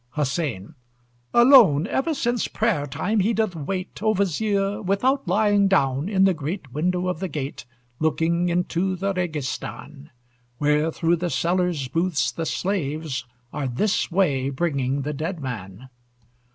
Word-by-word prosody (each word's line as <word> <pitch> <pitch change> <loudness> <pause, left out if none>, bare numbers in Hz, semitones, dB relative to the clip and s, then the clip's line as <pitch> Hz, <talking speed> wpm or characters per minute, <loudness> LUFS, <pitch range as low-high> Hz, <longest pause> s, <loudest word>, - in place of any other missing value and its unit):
HUSSEIN 140 - -2 0.6
Alone, 240 - +7
Ever 285 +8 -1
since 240 -4 0
prayer 200 -10 0
time, 210 +9 -1
he 210 +4 +2
doth 215 -5 0
wait, 185 +6 -5
O 215 0 +2
Vizier! 200 +1 0
without 245 +8 +1
lying 205 -2 +3
down, 140 -3 +1
In 190 -2 +3
the 190 -1 +5
great 155 -1 -5
window 180 +4 0
of 180 -3 -2
the 190 - -2
gate, 140 -6 -5 0.3
Looking 165 +2 +1
into 180 +2 0
the 195 +2 -1
Registàn, 150 -3 -5 0.5
Where 150 +3 +2
through 165 +2 +1
the 175 +1 -2
sellers' 175 -5 0
booths 165 -2 0
the 165 -1 -4
slaves 155 -8 -2 0.3
Are 145 -2 -2
this 160 - 0
way 145 -8 +1
bringing 140 -2 -1
the 150 +2 -3
dead 160 +5 -4
man. 115 -3 -7
170 Hz, 140 wpm, -23 LUFS, 145-195 Hz, 0.6 s, Alone